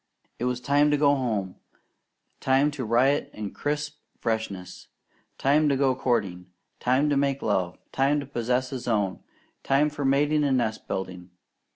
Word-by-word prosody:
It 120 - -1
was 125 -1 -1
time 145 +3 +3
to 145 - +2
go 145 -1 +4
home, 110 -9 -2 0.8
time 135 +3 +3
to 145 -3 -5
riot 125 +6 +2
in 105 -2 -5
crisp 150 0 -3 0.2
freshness, 110 -5 -4 0.5
time 150 +2 +3
to 140 - +2
go 135 -1 +2
courting, 100 -9 -1 0.3
time 130 +4 +2
to - - +3
make 140 0 0
love, 90 -4 0
time 140 +2 +2
to 140 - -5
possess 125 0 -1
his 130 -3 -5
own, 105 -5 0 0.4
time 145 +2 +2
for 145 -1 -5
mating 145 +3 +2
and 135 -2 +2
nest 110 -3 -2
building. 90 -1 -5
130 Hz, 160 wpm, -26 LUFS, 110-145 Hz, 0.8 s, go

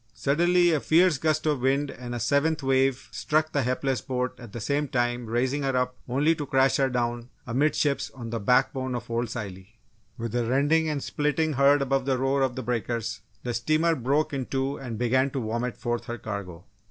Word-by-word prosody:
Suddenly, 175 +4 +3
a 155 - +2
fiercer 165 0 +3
gust 155 -1 +1
of 150 -3 +1
wind 135 +2 +1
and 120 -1 -7
a - - -3
seventh 140 +5 +1
wave 135 -1 +1
struck 155 +1 0
the 140 - +1
hapless 130 +1 -1
boat 125 -2 -2
at 120 -4 -10
the 120 - -6
same 145 +6 0
time 120 -2 -1
raising 130 +5 0
her 135 -2 0
up 125 0 0
only 145 +6 +3
to 150 -3 -5
crash 135 0 +3
her 135 -1 +2
down 120 -1 -2 0.2
amidships 140 +3 +1
on 120 -3 -7
the 115 - -2
back 125 +6 +3
bone 130 -1 -3
of 120 - -6
Old 120 0 -1
Scilly. 100 -1 -7 0.4
With 115 -2 -4
a 120 0 +1
rending 145 +6 +2
and 145 -3 -2
splitting 150 +1 0
heard 140 +1 +4
above 135 -1 0
the 135 -1 +1
roar 135 +2 +1
of 130 -2 +1
the 130 - -4
breakers, 115 -1 -2 0.2
the 120 - -2
steamer 155 +8 +2
broke 140 +3 0
in 135 -3 -3
two 135 +1 -1
and 120 -4 -6
began 130 +3 +2
to 135 - -3
vomit 115 +1 -3
forth 120 0 -3
her 120 -2 -5
cargo. 100 -6 -6
130 Hz, 205 wpm, -26 LUFS, 120-145 Hz, 0.4 s, heard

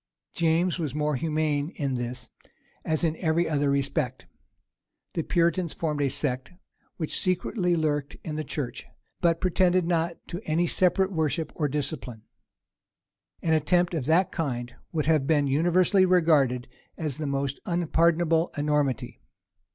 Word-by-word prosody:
James 170 +1 +1
was 150 -5 -3
more 150 -1 0
humane 150 0 0
in 140 -4 -2
this, 120 0 -4 0.5
as 160 +1 0
in 160 -1 +1
every 170 0 +1
other 145 -2 +1
respect. 140 -2 -1 0.9
The 165 - 0
Puritans 170 +1 +1
formed 150 -3 -2
a 140 - +2
sect 130 0 -1 0.5
which 160 -3 -1
secretly 185 -1 0
lurked 150 -3 -1
in 155 - -4
the 155 - -2
church, 140 -3 -5 0.3
but 165 -1 +2
pretended 185 -1 +2
not 170 0 0
to 175 +2 -5
any 165 +3 +1
separate 185 +3 +2
worship 160 -2 -1
or 150 - 0
discipline. 130 -6 -4 1.2
An 160 - +2
attempt 175 +3 +2
of 145 -6 -2
that 170 +3 +3
kind 120 -6 -3 0.2
would 155 -3 -1
have 155 -3 +2
been 150 -3 +3
universally 175 +7 +3
regarded 150 -9 +3 0.3
as 155 -4 -3
the 155 - -2
most 140 0 -2
unpardonable 170 -1 +2
enormity. 145 -3 -1
155 Hz, 140 wpm, -26 LUFS, 145-170 Hz, 1.2 s, that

